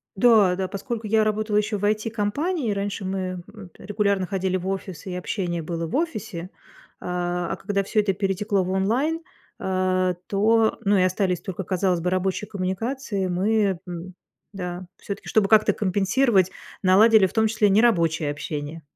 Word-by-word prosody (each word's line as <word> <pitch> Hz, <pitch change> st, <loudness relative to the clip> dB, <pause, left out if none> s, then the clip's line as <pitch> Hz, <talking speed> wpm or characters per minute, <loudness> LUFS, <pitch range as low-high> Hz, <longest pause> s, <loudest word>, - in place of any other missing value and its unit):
Да, 205 Hz, -4 st, +5 dB
да, 190 Hz, 0 st, -2 dB
поскольку 220 Hz, +3 st, -5 dB
я 220 Hz, +1 st, +3 dB
работала 215 Hz, 0 st, 0 dB
еще 210 Hz, 0 st, 0 dB
в 205 Hz, -, -2 dB
IT-компании, 225 Hz, -, -1 dB
раньше 200 Hz, 0 st, -3 dB
мы 185 Hz, -1 st, -3 dB
от 205 Hz, -4 st, -13 dB
регулярно 200 Hz, -1 st, 0 dB
ходили 190 Hz, -1 st, -1 dB
в 185 Hz, +1 st, -6 dB
офисы, 190 Hz, -2 st, -5 dB
и -, -, -4 dB
общение 175 Hz, -2 st, -3 dB
было 165 Hz, 0 st, -4 dB
в -, -, -4 dB
офисе. 215 Hz, -, -3 dB, 0.5 s
А, 175 Hz, 0 st, -2 dB
а -, -, -2 dB
когда 200 Hz, -1 st, -1 dB
всё 215 Hz, +2 st, 0 dB
это 195 Hz, -2 st, 0 dB
перетекло 195 Hz, +1 st, 0 dB
в 185 Hz, -, -3 dB
онлайн, 250 Hz, -, 0 dB, 0.4 s
а, 185 Hz, -1 st, 0 dB
то 220 Hz, +2 st, +2 dB
ну 200 Hz, 0 st, +3 dB
и -, -, +3 dB
остались 185 Hz, -1 st, 0 dB
только, 190 Hz, 0 st, -5 dB
казалось 180 Hz, -1 st, 0 dB
бы, 180 Hz, -, 0 dB
рабочие 185 Hz, +2 st, -1 dB
коммуникации, 200 Hz, +2 st, -2 dB
мы, 195 Hz, 0 st, +1 dB
м, 175 Hz, +1 st, -7 dB, 0.4 s
да, 180 Hz, -2 st, -6 dB
всё-таки, 200 Hz, -, -7 dB
чтобы 210 Hz, -3 st, +3 dB
как-то 215 Hz, 0 st, +5 dB
компенсировать, 195 Hz, 0 st, +2 dB, 0.3 s
наладили 205 Hz, +2 st, +6 dB
в -, -, -13 dB
том 220 Hz, -1 st, +3 dB
числе 210 Hz, -2 st, +2 dB
нерабочее 170 Hz, -8 st, +3 dB
общение. 150 Hz, +2 st, -5 dB
195 Hz, 160 wpm, -24 LUFS, 185-215 Hz, 0.5 s, наладили